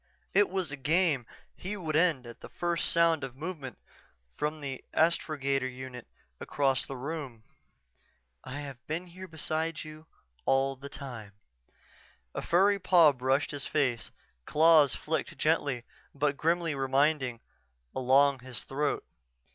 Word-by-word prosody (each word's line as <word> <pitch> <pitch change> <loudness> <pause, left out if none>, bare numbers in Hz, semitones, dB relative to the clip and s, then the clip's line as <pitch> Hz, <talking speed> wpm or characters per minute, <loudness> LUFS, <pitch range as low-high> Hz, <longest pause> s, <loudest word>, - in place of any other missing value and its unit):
It 205 +1 +4
was 185 -4 -2
a 145 - -5
game 150 -3 +2 0.3
he 205 +3 -5
would 160 -5 -3
end 155 -6 +3
at 120 -1 -11
the - - -9
first 170 -1 0
sound 165 -2 +3
of 130 -2 -6
movement 150 - -6 0.6
from 150 +1 -2
the 135 -3 -6
astrogator 140 -5 +1
unit 130 -1 -8 0.3
across 135 -2 0
the 135 - -6
room.... 135 -4 -5 1.0
"I 145 +3 -6
have 135 -4 -9
been 165 +4 -3
here 185 +2 -10
beside 160 0 -2
you 155 +1 -11 0.4
all 135 0 +2
the 140 +2 -9
time." 120 -9 -8 1.0
A - - -3
furry 200 +3 +3
paw 175 -5 +6
brushed 135 +1 0
his 145 -2 -4
face, 130 -6 0 0.4
claws 155 -3 +6
flicked 160 +1 -3
gently 145 -6 +1 0.3
but 145 0 +1
grimly 165 +2 +1
reminding 135 -2 +1 0.6
along 135 +2 +4
his 125 -3 -6
throat. 145 +2 -1
145 Hz, 135 wpm, -30 LUFS, 135-165 Hz, 1.0 s, paw